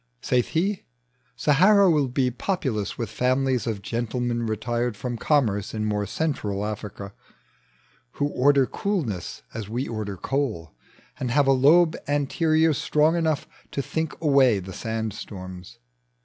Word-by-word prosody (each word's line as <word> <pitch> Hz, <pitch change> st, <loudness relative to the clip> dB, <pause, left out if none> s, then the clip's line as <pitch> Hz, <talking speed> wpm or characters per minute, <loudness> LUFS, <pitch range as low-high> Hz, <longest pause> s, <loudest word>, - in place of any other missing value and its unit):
Saith 125 Hz, -, +1 dB
he, 190 Hz, +5 st, -1 dB, 0.5 s
Sahara 190 Hz, +7 st, +5 dB
will 150 Hz, -5 st, +3 dB
be 125 Hz, 0 st, 0 dB
populous 125 Hz, -, -2 dB
With 115 Hz, -4 st, -4 dB
families 130 Hz, 0 st, +1 dB
of 105 Hz, -3 st, -3 dB
gentlemen 120 Hz, +1 st, -2 dB
retired 120 Hz, +1 st, -2 dB
From 125 Hz, +1 st, -4 dB
commerce 115 Hz, -7 st, +1 dB
in 110 Hz, 0 st, -1 dB
more 105 Hz, -1 st, -1 dB
Central 105 Hz, -, -2 dB
Africa, 105 Hz, -1 st, -6 dB, 1.0 s
Who -, -, -1 dB
order 140 Hz, 0 st, +4 dB
coolness 135 Hz, -, -3 dB
as 110 Hz, -3 st, -6 dB
we 125 Hz, +5 st, -2 dB
oi'der 105 Hz, -4 st, -4 dB
coal, 110 Hz, -, -2 dB, 0.5 s
And 125 Hz, -, -2 dB
have 140 Hz, +4 st, +3 dB
a 135 Hz, -, +4 dB
lobe 155 Hz, +6 st, +5 dB
anterior 155 Hz, +3 st, +2 dB
strong 150 Hz, +2 st, +2 dB
enougn 160 Hz, -3 st, 0 dB, 0.2 s
To 140 Hz, -, -2 dB
think 160 Hz, +2 st, -3 dB
away 135 Hz, -7 st, +4 dB
the 95 Hz, 0 st, -7 dB
sand 110 Hz, -1 st, -3 dB
storms. 95 Hz, -1 st, -9 dB
125 Hz, 135 wpm, -25 LUFS, 110-150 Hz, 1.0 s, Sahara